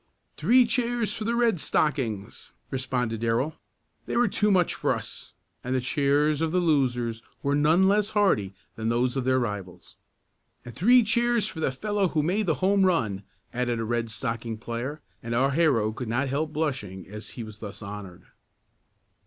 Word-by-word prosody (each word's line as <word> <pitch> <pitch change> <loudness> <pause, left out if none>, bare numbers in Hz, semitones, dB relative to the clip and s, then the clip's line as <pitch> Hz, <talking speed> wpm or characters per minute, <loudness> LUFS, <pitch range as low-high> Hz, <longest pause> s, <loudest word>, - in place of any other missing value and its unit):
"Three 250 +1 +5
cheers 235 -2 0
for 220 - -4
the 235 +1 0
Red 235 -6 +2
Stockings," 125 -12 -1 0.2
responded 125 -4 -2
Darrell. 115 +7 0 0.5
"They - - -1
were 240 0 +4
too 210 +1 +1
much 180 -4 +3
for - - 0
us," - - -8 0.3
and 125 +1 -1
the - - +2
cheers 145 +3 +1
of 165 -1 0
the 180 - +2
losers 125 -8 +1 0.2
were 140 - +1
none 160 +6 +4
less 205 +1 +3
hearty 105 - +2 0.2
than 110 0 -2
those 120 +2 +1
of 130 -2 -1
their 130 0 +3
rivals. 105 -7 -5 0.7
"And 120 - -8
three 245 - +5
cheers 235 0 +2
for 160 - -6
the 155 - +1
fellow 205 +7 0
who 155 -3 0
made 190 +6 0
the 160 - +2
home 195 0 +4
run!" 115 - +1 0.3
added 120 -1 -1
a 115 - -2
Red 115 0 -1
Stocking 115 -1 -4
player, 120 +6 -5 0.2
and 115 -1 -3
our 135 +3 +3
hero 135 -9 +2
could 120 +2 -6
not 130 +4 0
help 150 +3 -1
blushing 130 - -3
as 105 +2 -9
he 120 - -4
was 110 -1 -10
thus 105 -1 -8
honored. 100 -3 -8
135 Hz, 180 wpm, -26 LUFS, 115-185 Hz, 0.7 s, Three